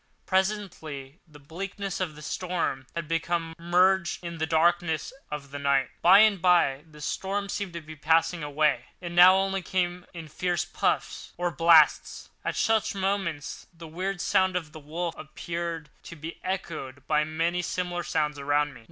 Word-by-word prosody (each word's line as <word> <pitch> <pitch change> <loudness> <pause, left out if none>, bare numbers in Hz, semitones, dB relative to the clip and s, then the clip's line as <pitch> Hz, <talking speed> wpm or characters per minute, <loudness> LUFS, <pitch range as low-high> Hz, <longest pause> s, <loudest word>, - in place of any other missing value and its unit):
Presently 185 -7 -2
the 150 -2 -15
blackness 190 +6 -5
of 175 -5 -3
the 150 - -11
storm 170 -6 -2
had 170 -2 -3
become 165 0 -1
merged 180 +1 +2
in 170 -1 -6
the 160 - 0
darkness 165 - +1 0.2
of 140 -2 -6
the 145 - -5
night. 140 -1 +1
By 190 +4 +8
and 210 -4 +4
by 170 -6 +3
the 150 -1 -14
storm 200 +5 -2
seemed 200 -4 -3
to 170 - -5
be 155 0 -10
passing 165 +3 +2
away: 150 +1 +1
it 175 -2 -6
now 180 +2 +8
only 195 0 0
came 180 -1 -2
in 165 -2 -8
fierce 175 +3 -1
puffs - - -2
or 175 0 -1
blasts. 165 -1 +4
At - - -2
such 220 -2 +1
moments 190 -6 -2
the 165 -1 -12
weird 180 +3 -3
sound 190 -2 +2
of 165 -4 -3
the 155 - -10
wolf 165 +3 -4
appeared 165 -1 -5
to - - -9
be 160 +2 -8
echoed 155 -8 -5
by 150 0 +2
many 165 +3 -1
similar 175 0 -2
sounds 150 -3 -1
around 145 +1 +1
me. 120 - -13
170 Hz, 170 wpm, -27 LUFS, 150-185 Hz, 0.2 s, By